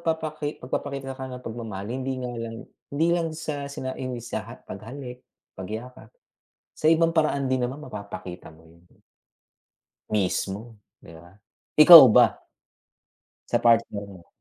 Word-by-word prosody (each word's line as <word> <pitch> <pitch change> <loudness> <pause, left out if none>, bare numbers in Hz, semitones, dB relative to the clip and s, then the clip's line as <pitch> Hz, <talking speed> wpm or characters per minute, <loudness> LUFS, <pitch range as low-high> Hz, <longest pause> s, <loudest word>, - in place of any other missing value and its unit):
papaki 155 -2 -3
pagpapakita 135 +1 -5
ng 130 - -13
kaniyang 125 -1 -7
pagmamahal 110 -4 -6
hindi 130 +1 -3
nga 125 -1 -5
lang 115 -1 -6 0.3
hindi 160 +4 0
lang 170 -1 0
sa 145 -3 -5
sina 130 -2 -5
'yung 130 -1 -4
sa 115 0 -7
paghalik, 125 +5 -9 0.3
pagyakap. 110 +7 -8 0.7
Sa 155 - +1
ibang 165 0 +3
paraan 155 -4 +1
din 130 -1 0
naman 125 +3 -3
mapapakita 100 - -9
mo 80 +1 -19
'yun. 85 +2 -22 1.2
Mismo, 105 +2 -2 0.2
'di 85 - -14
ba? 85 +2 -17 0.4
Ikaw 160 0 +12
ba - - +4 1.0
sa - - +2
partner 115 -3 +2
mo? 95 -4 -14
125 Hz, 135 wpm, -25 LUFS, 105-140 Hz, 1.2 s, Ikaw